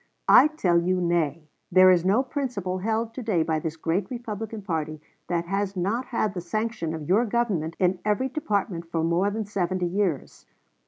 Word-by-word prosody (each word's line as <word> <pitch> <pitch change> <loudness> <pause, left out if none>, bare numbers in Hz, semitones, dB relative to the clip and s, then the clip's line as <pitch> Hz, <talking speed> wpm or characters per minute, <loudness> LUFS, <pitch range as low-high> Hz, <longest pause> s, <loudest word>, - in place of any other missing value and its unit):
I 290 - +8
tell 185 - +1
you 185 +1 +1
nay. 165 -3 0 0.2
There 185 +1 +7
is 175 -2 +3
no 200 +8 +3
principle 245 - -3
held 225 +3 -1
to 260 - -6
day 205 -8 +1
by 160 -1 0
this 160 +1 -4
great 170 +4 -1
Republican 225 -3 -5
party 155 -4 -3 0.3
that 170 -1 -1
has 195 +1 -2
not 210 +8 -1
had 215 -4 -1
the 180 - -4
sanction 215 -2 -3
of 155 -2 -7
your 205 +6 +4
Government 205 -9 -1
in 180 0 +1
every 210 +5 +1
department 200 - -2
for 165 -1 -1
more 170 +4 +2
than 215 +1 -3
seventy 185 -2 -1
years. 175 -5 -2
185 Hz, 180 wpm, -25 LUFS, 170-220 Hz, 0.3 s, I